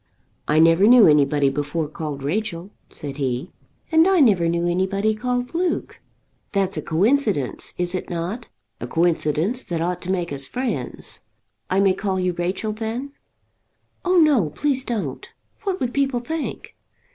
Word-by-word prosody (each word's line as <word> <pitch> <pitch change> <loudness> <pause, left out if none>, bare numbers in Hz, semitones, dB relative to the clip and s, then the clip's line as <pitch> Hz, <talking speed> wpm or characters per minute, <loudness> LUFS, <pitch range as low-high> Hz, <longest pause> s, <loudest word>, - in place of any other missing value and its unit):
"I 150 - +2
never 165 +5 +6
knew 240 -4 +8
anybody 145 -2 +4
before 145 +3 -2
called 150 -2 -6
Rachel," 180 +3 -3 0.2
said 140 -1 -5
he. 135 +4 -2 0.4
"And 320 +2 +5
I 385 -2 +4
never 195 - +4
knew 170 +1 0
anybody 195 +4 +1
called 245 +2 -2
Luke." 350 +1 -2 0.5
"That's 195 -1 +1
a - - -2
coincidence, 200 - 0
is 175 0 -1
it 185 - -4
not? 180 +8 -4 0.3
a 120 - -5
coincidence 170 - +1
that 170 -8 -4
ought 175 +2 -2
to 180 - -7
make 175 -5 -1
us 135 -1 -3
friends. 255 0 -4 0.5
I 185 - +2
may 195 -1 +4
call 190 -1 -2
you 180 -1 0
Rachel 180 +5 -2
then?" 225 +5 -4 0.9
"Oh, 365 0 +2
no; 285 - +4
please 265 - -1
don't. 200 - -4 0.4
What 385 -1 -1
would 245 -1 -2
people 275 -3 +1
think?" 315 +5 -5
185 Hz, 155 wpm, -22 LUFS, 165-245 Hz, 0.9 s, knew